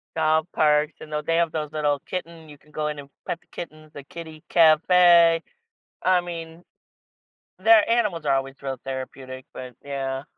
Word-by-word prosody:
Dog 160 0 +2
parks, 150 0 +2
you - - -9
know, 150 0 -3
they 165 +2 0
have 170 -2 +1
those 150 -1 -4
little 150 -2 0
kitten, 170 -2 -7
you 145 -1 -13
can 150 - -25
go 150 0 -2
in 150 -1 -5
and 140 -1 -10 0.2
pet 170 - -3
the - - -32
kitten, 155 -2 -10
the 140 - -9
kitty 160 0 -10
cafe 170 +1 +5 0.6
I 185 -1 +3
mean 165 -1 -8 0.9
their 220 +3 +5
animals 210 -9 +1
are 140 -1 +3
always 135 0 -3
real 135 -1 -4
therapeutic, 130 0 -7
but 125 -1 -8
yeah. 135 -1 -4
155 Hz, 175 wpm, -24 LUFS, 140-170 Hz, 0.9 s, cafe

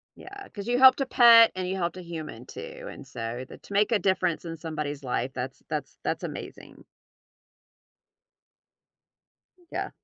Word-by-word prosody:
Yeah, 400 +1 -11
'cause 205 +1 -8
you 245 +1 +2
helped 260 +1 +8
a 270 - +1
pet 235 -3 +8
and 185 -1 -3
you 190 +1 -2
helped 170 -1 -2
a 185 - -7
human 155 -8 -7
too, - - -9
and 140 - -11
so 120 0 -5
th - - -13
to - - -13
make 210 +3 +2
a 215 - +4
difference 185 -4 0
in 165 -1 -6
somebody's 150 -3 -4
life, 130 +1 -2
that's 130 +1 -6
that's 150 -3 -4
that's - - -2
amazing. - - -8 2.9
Yeah. - - -3
175 Hz, 160 wpm, -27 LUFS, 145-235 Hz, 2.9 s, helped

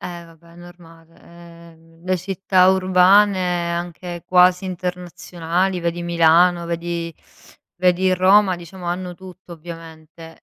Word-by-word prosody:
Eh, 175 -1 -8
vabbè 165 0 -20
è - - -19
normale, 165 -2 -17 0.5
ehm, 165 +1 -23
le 185 0 0
città 185 0 +1
urbane 185 -1 +2
anche 175 0 -6
quasi 180 +1 +3
internazionali, 180 0 -4
vedi 170 0 -3
Milano, 170 +1 +2
vedi 170 0 -5 0.6
vedi 185 +1 +1
Roma 190 +1 +3
diciamo 175 +1 -11
hanno 180 +1 -4
tutto 185 0 -14
ovviamente. 165 0 -13
175 Hz, 115 wpm, -20 LUFS, 170-185 Hz, 0.6 s, quasi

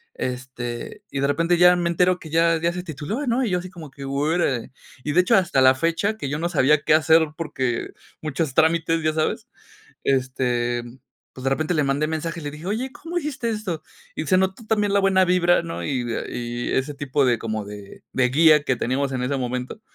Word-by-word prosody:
este, 125 -2 -5
y 140 - -3
de 140 - +2
repente 165 +5 +2
ya 180 0 +7
me 175 -1 0
entero 180 +1 +2
que 160 - -10
ya 165 +1 +3
ya 170 0 +1
se 180 0 -5
tituló, 170 - -4
¿no?, 250 +1 +1
y 210 - -2
yo 180 - +1
así 185 +1 -8
como 165 -5 -10
que: 140 +1 -11
"Órale", 140 -2 -1 0.3
y 150 - -1
de 180 - +6
hecho, 180 - +3
hasta 170 -8 +2
la 130 0 +7
fecha 170 +9 0
que 140 - -4
yo 145 +2 -2
no 170 +1 -1
sabía 150 -2 +3
qué - - +2
hacer 160 +1 +5
porque 130 -7 -2 0.3
muchos 155 -2 -2
trámites, 165 +2 +2
¿ya 155 0 +1
sabes?, 155 0 -1 0.6
este, 125 -2 0 0.5
pues 130 - -10
de 135 - +1
repente 155 +5 0
le 150 -2 +2
mandé 140 +3 +1
mensaje 165 +1 -3
y - - -10
le 145 - -4
dije: 150 +4 -10
"Oye, 235 +6 -2
¿cómo 335 +4 -8
hiciste 275 -7 -3
esto?", 195 -8 -4 0.3
y - - -3
se 185 - +4
notó 190 +4 0
también 210 -2 +1
la 200 - +4
buena 190 -1 +4
vibra, 175 -1 +3
¿no?, 165 - -5
y 135 -4 -1
de 120 - -3
y 120 0 -4
ese 135 +2 -1
tipo 140 0 0
de 120 -2 +2
como 110 -1 -3
de 100 -1 -11
de 130 -1 +2
guía 150 +2 +5
que 130 -3 0
teníamos 130 +4 -1
en 125 -1 -2
ese 135 +2 -1
momento, 125 - -4
155 Hz, 220 wpm, -23 LUFS, 130-180 Hz, 0.6 s, ya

